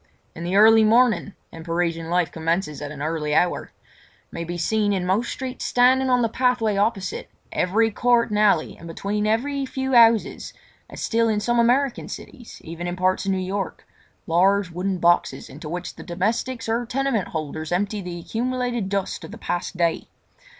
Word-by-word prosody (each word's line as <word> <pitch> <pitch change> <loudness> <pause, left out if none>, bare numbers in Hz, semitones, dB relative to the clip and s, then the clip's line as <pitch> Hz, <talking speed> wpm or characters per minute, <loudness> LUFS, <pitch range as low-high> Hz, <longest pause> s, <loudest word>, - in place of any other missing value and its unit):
In 170 - -8
the 175 +3 -2
early 220 +2 +7
morning—and 215 -7 +1
Parisian 165 -1 -2
life 175 -2 +1
commences 165 -1 -2
at 145 - -5
an 145 -1 -7
early 155 -1 -1
hour—may 175 -1 -4
be 175 +1 -5
seen 205 +4 +1
in 185 -2 -1
most 200 +6 0
streets 260 -1 -5
standing 260 +2 +3
on 250 -1 +3
the - - +3
pathway 240 -2 +1
opposite 200 -2 -1 0.2
every 220 +5 +1
court 240 +2 +2
and 210 - 0
alley 200 -7 +2
and 170 - -12
between 205 +5 -2
every 275 +6 0
few 265 0 -3
houses, 230 -2 +4 0.4
as - - -7
still 230 0 +2
in 215 -1 +1
some 240 +3 +1
American 250 +3 +2
cities, 240 -3 -10
even 170 +2 -6
in 175 - -3
parts 185 +1 0
of - - +2
New 190 - 0
York, 190 0 -4 0.4
large 190 +3 +2
wooden 185 +2 -2
boxes 175 0 +1
into 150 - -9
which 175 +2 -5
the - - -10
domestics 225 +7 -2
or 230 +2 0
tenement 265 -5 -1
holders 155 0 -5
empty 200 +3 -1
the 175 -2 -6
accumulated 245 0 -2
dust 195 -1 -2
of - - -8
the 225 - -9
past 175 -3 -4
day. 170 -1 0
200 Hz, 175 wpm, -23 LUFS, 175-235 Hz, 0.4 s, early